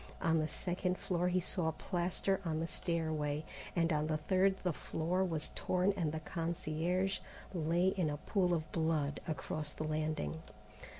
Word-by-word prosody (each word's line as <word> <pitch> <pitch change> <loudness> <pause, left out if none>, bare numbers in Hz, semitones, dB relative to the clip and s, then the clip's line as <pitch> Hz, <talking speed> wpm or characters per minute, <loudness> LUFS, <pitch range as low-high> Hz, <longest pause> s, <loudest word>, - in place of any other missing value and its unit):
On 165 -1 +3
the 155 - +1
second 180 +3 -1
floor 180 -1 0
he 180 0 +3
saw 175 -2 +1
plaster 185 +3 0
on 160 -3 0
the 165 - 0
stairway, 155 -3 -1 0.3
and 165 -1 +3
on 150 0 +1
the 155 -1 +1
third 190 +5 +3
the 180 -2 +1
floor 170 +5 0
was 165 -5 -1
torn 185 +2 +2
and 165 -6 0
the 160 - -2
concierge 170 +3 0 0.3
lay 170 +2 +3
in 185 -5 +1
a 145 - -2
pool 180 +3 +1
of 155 -1 -3
blood 160 -3 +1
across 155 -1 -2
the 155 - -5
landing. 155 - -1
165 Hz, 165 wpm, -35 LUFS, 155-180 Hz, 0.3 s, On